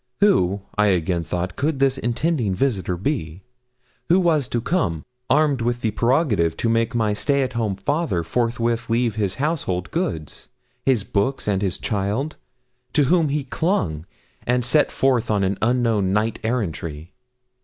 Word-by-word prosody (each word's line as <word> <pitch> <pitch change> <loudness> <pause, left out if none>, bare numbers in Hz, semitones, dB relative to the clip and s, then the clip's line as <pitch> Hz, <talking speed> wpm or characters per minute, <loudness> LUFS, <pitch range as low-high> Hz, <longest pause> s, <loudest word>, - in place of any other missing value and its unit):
Who, 100 - +3 0.2
I 105 - +5
again 90 -2 +1
thought, 90 +2 -3
could 150 +1 0
this 135 0 +2
intending 120 - 0
visitor 95 -6 0
be, 95 - -3 0.7
who 180 +3 +5
was 160 -7 +2
to 120 - -1
come, 115 - -1 0.2
armed 145 -4 +3
with 120 +1 -1
the 110 - 0
prerogative 115 - +1
to 115 - 0
make 115 +2 +1
my 110 -3 +1
stay 140 +6 +1
at 130 - -3
home 110 -4 -1
father 145 - -1
forthwith 115 +3 -1
leave 115 0 +1
his 100 -3 -1
household 130 - -2
goods 155 - -3 0.4
his 125 -7 +3
books 105 +7 -1
and 100 -2 +1
his 95 -4 -1
child 105 +9 -2 0.6
to 150 - +4
whom 165 -4 +3
he 145 0 -1
clung, 115 - -1 0.4
and 125 0 +2
set 145 +4 +3
forth 130 -4 +1
on 105 -2 +2
an 95 +1 -1
unknown 115 -5 +2
knight 110 +2 0
errantry? 85 -8 -3
115 Hz, 155 wpm, -22 LUFS, 95-135 Hz, 0.7 s, I